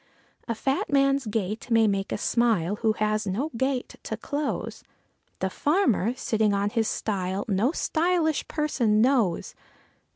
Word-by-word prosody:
A 230 - -1
fat 270 +6 -1
man's 275 -2 +3
gait 215 +1 -3
may 225 -1 +4
make 195 -1 -1
us - - -3
smile, 210 -6 +1
who 220 -1 +1
has 215 -1 -1
no 250 +12 -2
gate 260 +1 -2
to 220 - -5
close; 285 +5 -3 0.6
The 190 - +1
farmer, 255 - +1
sitting 220 -4 +1
on 200 +1 0
his 225 -2 +1
stile 190 -1 -2
no 210 +4 +2
_sty_lish 325 -1 0
person 250 -9 +1
knows. 230 -7 +2
225 Hz, 140 wpm, -26 LUFS, 205-275 Hz, 0.6 s, may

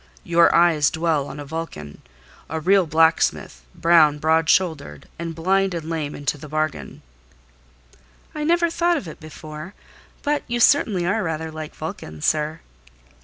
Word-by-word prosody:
Your 170 0 +4
eyes 165 -4 +4
dwell 160 -3 -1
on 140 - -8
a 145 - -7
Vulcan,—a 75 - -8
real 185 +2 +3
blacksmith, 160 - +1
brown, 160 -3 +4
broad 160 +1 +1
shouldered: 155 - 0
and 165 -1 -5
blind 190 +3 +1
and 160 -2 -5
lame 155 -3 -3
into 145 +1 -3
the 150 - -10
bargain." 155 0 -3 1.3
"I 300 - -4
never 340 +1 +2
thought 345 0 +1
of 185 - -6
it, 155 - -10
before; 155 +3 -10 0.5
but 295 0 0
you 240 0 -2
certainly 215 -9 +3
are 210 +5 0
rather 160 -3 -3
like 155 -1 -8
Vulcan, 80 - -7
sir." 155 +1 0
160 Hz, 145 wpm, -22 LUFS, 150-175 Hz, 1.3 s, Your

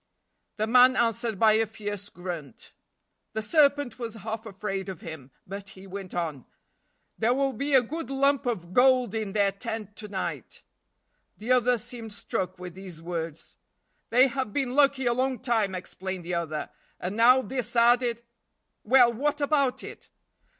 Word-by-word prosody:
The 215 - +1
man 250 +3 +6
answered 230 -2 0
by 220 +2 +5
a 220 +1 +3
fierce 205 -1 -5
grunt. 175 - -8 0.6
The 220 0 -2
serpent 285 -1 +3
was 230 -2 -5
half 220 +1 -6
afraid 195 -1 -4
of 185 -4 -7
him, 150 -5 -8 0.2
but 195 +1 -7
he 195 0 -13
went 195 -1 -7
on. 160 -7 -3 0.7
"There 235 +3 +3
will 275 0 +1
be 280 +1 0
a 255 - +6
good 300 +2 -5
lump 275 0 +2
of 180 -7 -3
gold 255 -2 +4
in 215 -3 -3
their 200 -2 +3
tent 215 0 -6
to 210 - -6
night." 195 -2 -5 0.7
The 225 +4 -3
other 250 -1 +4
seemed 230 -1 -6
struck 185 -2 -3
with 180 -1 -8
these 185 -3 -10
words. 165 -2 -5 0.5
"They 250 +3 +6
have 260 -3 -2
been 260 +1 -1
lucky 275 -1 +3
a 240 - +3
long 260 +1 0
time," 225 -7 0
explained 185 0 -6
the 180 - -3
other, 160 -3 -3 0.3
"and 185 +3 -4
now 250 +3 +6
this 245 -3 -3
added 235 0 +3 0.3
" - - -51
"Well, 245 +1 +5
what 290 +5 -1
about 280 -3 +1
it?" - - -10
225 Hz, 165 wpm, -27 LUFS, 190-255 Hz, 0.7 s, man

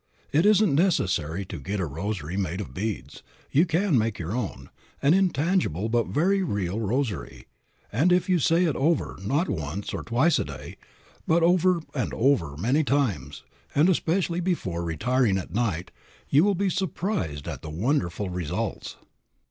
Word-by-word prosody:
It 160 +7 +4
isn't 210 -5 +4
necessary 95 - +1
to - - -7
get 100 +2 -3
a 95 - 0
rosary 85 +2 -4
made 95 -2 -2
of 105 - -6
beads. 105 +2 -4 0.3
You 160 +6 +4
can 165 - +2
make 110 -1 -1
your 85 +1 -4
own, 100 - -4 0.3
an 140 +3 +4
intangible 170 - +1
but 120 0 +1
very 190 +7 +2
real 100 - -2
rosary, 110 - -2 0.5
and 150 +12 +2
if 180 0 +3
you 180 -2 +3
say 165 +4 +3
it 160 -5 +1
over, 155 - 0
not 140 - 0
once, 80 +4 -4
or - - -3
twice 130 +9 +2
a - - +1
day, 70 -2 -9 0.5
but 165 +1 +3
over 180 0 +3
and 130 - -2
over 95 - +1
many 125 - +2
times, 105 - -1 0.3
and 155 +6 +5
especially 175 0 +1
before 130 - -2
retiring 100 - +1
at 90 - -6
night, 100 -7 -1 0.4
you 145 +4 +5
will 200 0 +3
be 190 +1 0
surprised 165 - -2
at 75 -5 -5
the 80 - -7
wonderful 95 - -1
results. 90 +5 -3
120 Hz, 165 wpm, -26 LUFS, -, 0.5 s, and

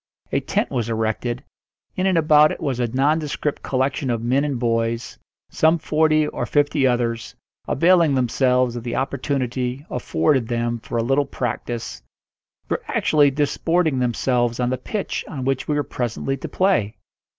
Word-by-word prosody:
A - - +2
tent - - -1
was 115 -3 -1
erected; 115 +3 -2 0.5
in 185 +1 +1
and 185 -3 +2
about 150 -1 +5
it - - -5
was 135 -5 -2
a 120 - +1
nondescript 145 +3 0
collection 135 +1 -1
of 115 -2 -1
men 130 +4 +2
and 145 -3 -1
boys; 115 0 -1 0.3
some 160 +2 +3
forty 155 -1 +2
or - - -3
fifty 145 -2 +2
others, 120 -2 -1 0.3
availing 170 -1 +4
themselves 125 -1 +2
of 120 - -4
the 120 -1 -3
opportunity 130 -1 -2
afforded 135 -7 +1
them 120 0 -1
for 115 - -5
a 115 - +1
little 135 +3 +1
practice, 120 - -4 0.7
were - - -1
actually 145 -2 +3
disporting 150 +2 +1
themselves 120 0 0
on 125 0 +1
the 130 - 0
pitch 205 +9 -3
on 130 -4 -5
which 135 -1 -1
we 150 - 0
were 145 - +1
presently 125 +1 -3
to 135 - -7
play. 180 - +1
130 Hz, 160 wpm, -22 LUFS, 120-150 Hz, 0.7 s, about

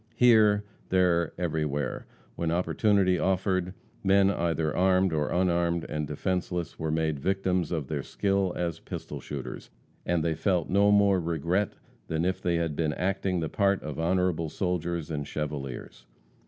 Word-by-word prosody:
Here, 110 -4 +5 0.3
there, 90 -3 +2
everywhere, 75 -4 -2 0.3
when 85 - -1
opportunity 95 +2 +2
offered, 95 -1 0 0.3
men 100 0 +4
either 80 -4 -1
armed 95 -1 +3
or 75 -1 0
unarmed 85 -2 +1
and 75 -1 -3
defenseless 90 +2 -3
were 80 - -2
made 80 -2 0
victims 95 0 0
of 80 -5 -1
their 75 -1 -2
skill 100 +3 0
as 85 -2 -2
pistol - - -7
shooters, 70 -2 -7 0.3
and 85 -2 0
they 85 - +1
felt 90 0 0
no 100 +2 +4
more 100 -2 +4
regret 85 +4 0 0.3
than 80 +1 -1
if 95 0 -1
they 85 -1 +1
had 85 -3 -1
been 80 -1 0
acting 95 0 -1
the 80 - -1
part 100 -1 +1
of 75 -1 -5
honorable 85 -1 +1
soldiers 85 -2 -2
and 75 -2 -3
chevaliers. 70 -5 -5
85 Hz, 150 wpm, -28 LUFS, 80-95 Hz, 0.3 s, Here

